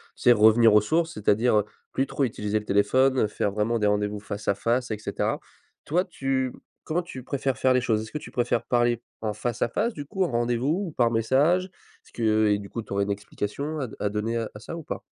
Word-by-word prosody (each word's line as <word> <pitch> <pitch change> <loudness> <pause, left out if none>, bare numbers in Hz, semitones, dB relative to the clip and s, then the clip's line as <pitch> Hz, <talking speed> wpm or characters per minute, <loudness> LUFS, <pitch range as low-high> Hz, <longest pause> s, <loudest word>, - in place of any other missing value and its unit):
tu - - -12
sais, 125 - +7
revenir 110 0 +6
aux 105 - +7
sources, 165 +8 0
c'est-à-dire 110 -1 +2
heu, 105 - -1 0.3
plus 135 - 0
trop 140 - 0
utiliser 105 -3 -2
le 105 - -12
téléphone, 120 +5 +3
faire 105 - -1
vraiment 110 +3 0
des 105 - +2
rendez-vous 105 0 0
face 100 0 -7
à - - +3
face 120 +3 0
et 105 - -1
cetera. 105 - -2 0.5
Toi 175 +5 +1
tu 135 -6 -1 0.3
comment 170 +3 -1
tu 130 -7 -9
préfères 135 -2 -2
faire 130 -1 +3
les 125 - +3
choses? 110 -3 +1
Est-ce 110 - -10
que - - -3
tu - - -11
préfères 120 -1 0
parler 120 -1 +2 0.2
en 110 -1 -2
face 115 +3 -4
à - - +2
face 220 - -1
du 145 - -7
coup, 190 +6 -1
en - - -3
rendez-vous, 120 - 0
ou 165 - -6
par 120 -4 +2
message? 140 +11 +3 0.4
Est-ce - - -22
que 110 -2 +2
et 105 -1 +3
du 100 - -9
coup 115 - -4
tu 105 - -18
aurais 100 - +1
une 100 - -2
explication 105 +9 -4
à 135 - -2
d 110 - -11
à 105 - 0
donner 110 +3 -2
à 115 -2 -2
à 105 - -8
ça 140 - -7
ou 165 - -7
pas? - - -6
120 Hz, 250 wpm, -26 LUFS, 105-135 Hz, 0.5 s, sais